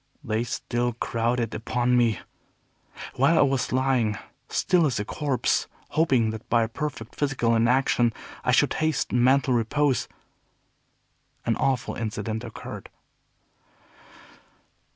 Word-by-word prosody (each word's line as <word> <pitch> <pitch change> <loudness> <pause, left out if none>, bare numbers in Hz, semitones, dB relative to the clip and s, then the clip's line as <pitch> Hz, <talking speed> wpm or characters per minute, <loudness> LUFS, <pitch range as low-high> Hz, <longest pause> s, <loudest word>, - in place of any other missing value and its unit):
They 110 -3 -1
still 120 0 -2
crowded 115 0 -1
upon 120 +3 0
me. 115 -4 +2 1.0
While 140 +6 +4
I - - +6
was 135 -2 0
lying 125 -5 +1 0.3
still 175 -4 +2
as 120 -6 -1
a 105 - -2
corpse, 140 +1 0 0.2
hoping 135 -8 +2
that 110 0 -9
by 115 -1 +3
a - - -1
perfect 120 -2 -5
physical 135 -5 0
inaction 120 0 +3 0.3
I - - +2
should - - +3
hasten 155 -6 +1
mental 130 0 +4
repose, 130 +3 +1 1.4
an 115 - +1
awful 130 -3 0
incident 110 0 -4
occurred. - - -8
120 Hz, 115 wpm, -25 LUFS, 115-135 Hz, 1.4 s, I